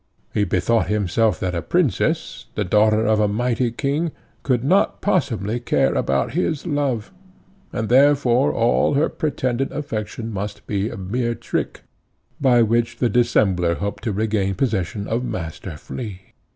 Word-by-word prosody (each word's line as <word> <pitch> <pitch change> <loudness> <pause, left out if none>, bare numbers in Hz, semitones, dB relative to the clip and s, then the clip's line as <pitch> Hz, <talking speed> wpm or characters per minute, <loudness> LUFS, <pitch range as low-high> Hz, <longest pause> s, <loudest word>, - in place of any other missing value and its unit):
He 105 - +2
bethought 110 +6 +1
himself 105 +2 +1
that 90 -1 -1
a 85 - -1
Princess, 165 - 0
the - - 0
daughter 110 +3 +3
of 110 0 +3
a 105 - +3
mighty 120 +3 0
king, 145 +7 -1 0.3
could 125 -4 0
not 185 +9 +2
possibly 120 - 0
care 120 - +1
about 70 0 0
his 160 -3 -1
love, 145 - -1 0.6
and 110 -2 -2
therefore 135 0 +4
all 120 +4 +2
her 145 +3 +2
pretended 130 -3 -1
affection 115 -5 -4
must 105 +1 -5
be 100 +1 -1
a 115 - -7
mere 115 +5 -2
trick, - - -3 0.6
by 125 -4 +4
which 115 +1 0
the 120 - +1
dissembler 95 -7 +2
hoped 100 +4 -4
to 110 - 0
regain 100 -2 0
possession 100 -3 -1
of 115 +3 -1
Master 85 -5 -5
Flea. 95 - -8
115 Hz, 150 wpm, -21 LUFS, 100-130 Hz, 0.6 s, therefore